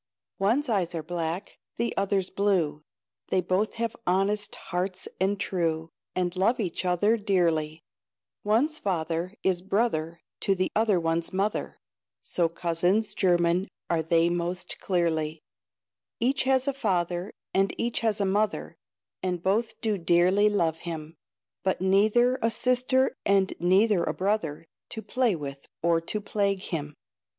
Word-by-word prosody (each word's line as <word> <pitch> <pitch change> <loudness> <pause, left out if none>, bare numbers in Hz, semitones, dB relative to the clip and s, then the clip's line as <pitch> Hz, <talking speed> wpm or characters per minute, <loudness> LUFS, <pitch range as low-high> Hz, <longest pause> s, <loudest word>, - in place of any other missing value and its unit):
One's 235 +9 +2
eyes 190 -7 0
are 160 - -3
black, 170 +3 -4 0.2
The 235 +1 -1
other's 195 -2 0
blue; 185 -7 +1 0.5
They - - +2
both 185 +4 0
have 230 -1 -2
honest 200 +3 +1
hearts 185 +1 -3
and 195 +2 +1
true, 165 -4 -1 0.3
And 180 0 -1
love 220 +7 +2
each 185 -3 -2
other 205 +6 +3
dearly: 165 -7 0 0.6
One's 275 +9 +2
father, 175 - -2
is 185 -2 +1
brother 180 -5 0 0.2
To 195 - +1
the 185 0 0
other 215 -4 +3
one's 165 0 0
mother, 195 +3 -1 0.4
So 170 -2 0
cousins 175 +5 +1
german 175 0 +2 0.2
are 165 -1 +2
they 165 +1 +3
most 175 +1 -2
clearly; 160 -4 -1 0.8
Each 265 +3 +1
has 265 0 +3
a 280 - +1
father, 180 -6 -1 0.2
And 195 +1 +2
each 235 0 0
has 220 -2 +1
a 200 - +2
mother, 205 +3 0 0.4
And 180 -2 -2
both 220 +4 0
do 215 -3 0
dearly 180 +5 +4
love 165 -6 0
him; 160 -1 -6 0.5
But 190 - 0
neither 215 +7 +3
a 230 - +3
sister, 255 +3 +2
And 195 -1 +3
neither 190 +2 +3
a - - -2
brother, 185 -6 -1 0.2
To 220 -2 -6
play 250 -6 +1
with, 140 -3 -7 0.2
or 170 -1 +3
to 210 +6 -3
plague 200 -2 -1
him. 150 -5 -4
190 Hz, 140 wpm, -27 LUFS, 170-210 Hz, 0.8 s, dearly